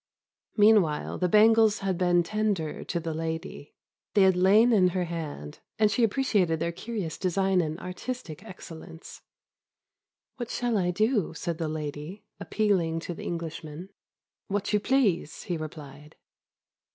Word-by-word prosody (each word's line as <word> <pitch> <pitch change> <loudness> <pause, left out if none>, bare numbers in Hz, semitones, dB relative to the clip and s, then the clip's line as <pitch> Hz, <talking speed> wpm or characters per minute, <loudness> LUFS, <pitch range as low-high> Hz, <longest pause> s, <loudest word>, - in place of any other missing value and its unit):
Meanwhile 205 -8 +3
the 180 - +1
bangles 220 +1 +5
had 195 -1 0
been 175 -1 +3
tendered 205 -5 -2
to 170 - -1
the 165 -1 -4
lady; 160 -1 -5 0.4
they 200 - +6
had 190 -1 +5
lain 205 +6 +5
in 190 -4 +5
her 180 0 -1
hand, 155 - -6 0.2
and 215 -1 +3
she 235 +4 +1
appreciated 205 -8 +1
their 170 - -1
curious 190 -2 -5
design 190 0 +1
and 160 0 -4
artistic 180 -2 -6
excellence. 165 -2 -11 1.2
"What 240 -3 -5
shall 245 -2 -1
I 180 -3 +1
do?" 215 -1 0
said 170 0 -4
the 160 -2 -2
lady, 155 +4 -6 0.2
appealing 180 -7 0
to 175 - -5
the - - -9
Englishman. 165 0 -6 0.6
"What 200 +1 -2
you 210 - +4
please," 205 - +1
he 175 - -3
replied. 150 -2 -9
180 Hz, 140 wpm, -27 LUFS, 160-210 Hz, 1.2 s, they